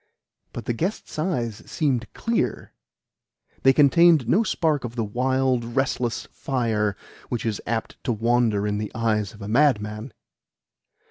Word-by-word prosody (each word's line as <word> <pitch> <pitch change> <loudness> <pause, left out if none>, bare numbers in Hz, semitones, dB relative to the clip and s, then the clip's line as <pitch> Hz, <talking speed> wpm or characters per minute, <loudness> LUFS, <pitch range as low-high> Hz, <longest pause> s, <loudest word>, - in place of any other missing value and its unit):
But - - -7
the 120 - 0
guest's 170 - -3
eyes 120 - -1
seemed 130 -7 -1
clear 225 - -2 0.9
they 135 - +6
contained 150 0 +5
no 180 - +4
spark 160 -9 0
of 120 -1 -6
the 115 - -1
wild, 130 +3 +1
restless 125 -3 0
fire 110 -6 -1 0.3
which 120 - -3
is 110 -3 -2
apt 115 0 -3
to - - +1
wander 115 -2 +1
in 105 0 -1
the 105 - -4
eyes 110 -2 0
of 100 -1 -8
madmen. 110 -2 +1
120 Hz, 135 wpm, -24 LUFS, 110-135 Hz, 0.9 s, they